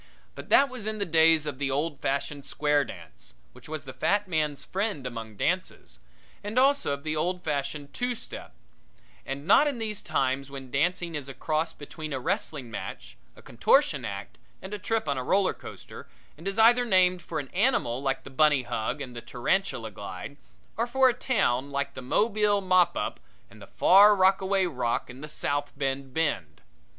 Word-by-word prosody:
But - - -10
that 280 - +6
was 250 -5 -7
in 215 0 -2
the 200 - -1
days 160 -2 +4
of 145 -3 -5
the 140 -1 -1
old 145 +1 -1
fashioned 140 +1 -2
square 145 0 +1
dance, 90 - -11 0.2
which - - -14
was 155 -1 -5
the 130 -2 -9
fat 205 +10 +1
man's 155 -5 -1
friend 195 -8 -3
among 115 -3 -6
dances, - - -2 0.4
and 210 +4 -5
also 275 - +3
of 140 0 -6
the 155 0 -2
old 180 +3 -1
fashioned 140 -1 -3
two 245 0 -1
step, - - -9 0.7
and 140 +2 -5
not 250 - +6
in 280 -4 -1
these 215 -3 -3
times 135 +1 -1
when 135 -2 -9
dancing 170 +4 0
is 145 -3 -5
a 135 - -8
cross 160 +1 -1
between 155 0 -8
a 135 - -2
wrestling 150 - -3
match, - - -7 0.2
a - - -16
contortion 140 - +2
act 100 -2 -7 0.2
and 190 +2 -8
a 210 - -4
trip 225 -1 -1
on 140 -2 0
a - - -3
roller 195 +8 +2
coaster, - - -11 0.3
and 165 +5 -9
is 195 +1 -2
either 235 +2 +6
named 185 -5 +3
for - - -5
an 140 -3 -4
animal, 185 - +1
like 135 -1 -1
the - - -11
Bunny 145 -1 +3
Hug 120 +3 -3
and 125 -3 -7
the 120 - -6
Tarantula 125 - -1
Glide, 100 +6 -8 0.4
or 230 +2 0
for 260 +1 +4
a - - +1
town, 140 - 0
like 140 0 -2
the - - -7
Mobile 205 - +2
Mop 185 -2 +3
Up, - - -3 0.3
and 110 +1 -15
the - - -11
Far 195 - +6
Rockaway 190 0 +3
Rock 125 -7 -2
and 130 +4 -11
the 150 - -7
South 145 0 -2
Bend 135 -1 -2
Bend. 125 - -2
150 Hz, 190 wpm, -27 LUFS, 135-195 Hz, 0.7 s, that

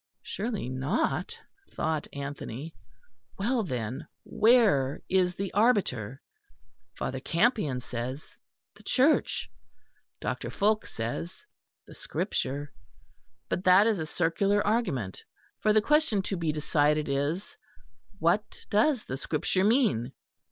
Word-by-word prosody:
Surely 215 - -3
not, 130 - -1 0.4
thought 155 -1 -1
Anthony. 140 +1 -6 0.6
Well, 235 +5 +1
then, 125 - -4 0.2
where 215 - +3
is 180 -1 +2
the 195 -1 -4
arbiter? 165 - +1 0.7
Father 130 - -3
Campion 165 - +1
says, 125 +4 -6 0.4
The - - -16
Church; 275 +4 +2 0.7
Dr. - - -3
Fulke 215 +2 +1
says, 115 -8 -5 0.4
The - - -13
Scripture. 145 +2 -3 0.7
But 180 - -2
that 185 +3 +7
is 220 -4 +2
a 160 - -3
circular 195 +6 +1
argument, 145 - -1 0.4
for 215 - +3
the 215 0 +4
question 300 -8 +3
to 195 - -2
be 165 -3 0
decided 150 0 +1
is: 145 +8 -2 0.6
What 180 +5 0
does 230 +4 +3
the 130 - -4
Scripture 160 +6 0
mean? 205 - +2
170 Hz, 110 wpm, -28 LUFS, 135-215 Hz, 0.7 s, that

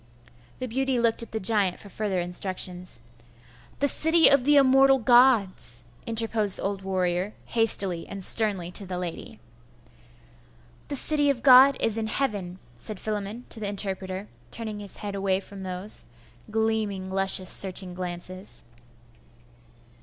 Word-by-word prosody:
The 255 - -5
beauty 265 +1 -1
looked 230 -1 +2
at 230 - -6
the 220 - -3
giant 200 -2 +2
for 205 - -13
further 200 -2 -3
instructions. 180 0 -3 0.8
'The 285 - +2
City 320 +3 +4
of 275 -3 +4
the 295 +1 +4
immortal 270 0 +5
Gods,' 230 - +2 0.2
interposed 225 -3 +2
the - - -8
old 195 0 -3
warrior, 185 +1 -2
hastily 195 -7 +1
and 195 -1 -4
sternly, 195 -5 +1
to 195 +1 -6
the 180 -1 -5
lady. 175 -2 -7 1.5
'The 285 - -3
city 290 +1 +6
of 250 -4 -2
God 265 +1 +7
is 225 0 +1
in 220 - -3
heaven,' 205 -8 -3 0.2
said 185 - -4
Philammon 215 +2 -5
to 225 - -4
the 205 -2 -3
interpreter, 195 -1 -3 0.2
turning 220 - -6
his 205 -1 -7
head 205 -1 -6
away 195 -1 -1
from 195 0 -11
those 185 +2 -1 0.4
gleaming, 215 -3 -2
luscious, 190 -1 +1
searching 185 -1 +1
glances. 180 +2 -5
205 Hz, 140 wpm, -25 LUFS, 185-230 Hz, 1.5 s, God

